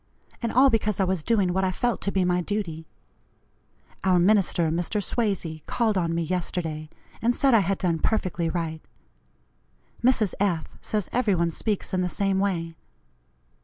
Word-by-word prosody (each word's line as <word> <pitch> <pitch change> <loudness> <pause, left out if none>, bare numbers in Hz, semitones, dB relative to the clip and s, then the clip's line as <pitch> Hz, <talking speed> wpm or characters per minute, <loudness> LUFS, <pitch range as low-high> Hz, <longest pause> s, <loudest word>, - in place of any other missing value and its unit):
And 230 -1 -1
all 265 +2 +5
because 215 -3 0
I - - +4
was 185 -2 0
doing 195 -2 +1
what 190 +1 +1
I 185 - +1
felt 240 +5 -1
to 200 - -1
be 190 -2 +1
my 180 0 +2
duty. 170 -5 -4 1.2
Our 185 -1 +4
minister, 175 -3 +3
Mr. 175 +6 -1
Swazey, 195 -7 -2
called 225 -3 +1
on 170 -3 0
me 170 - 0
yesterday 160 -3 -3 0.3
and 240 +2 +2
said 275 -3 +3
I 230 - +7
had 195 0 0
done 170 -3 0
perfectly 180 -6 0
right. 160 -1 -3 1.2
Mrs. 235 -5 +3
F 180 -5 +1 0.2
says 210 -3 -2
every 230 -6 +2
one 170 -1 +1
speaks 205 +4 -2
in 185 - +1
the 180 - 0
same 195 +1 0
way. 170 -4 -1
185 Hz, 165 wpm, -25 LUFS, 170-210 Hz, 1.2 s, I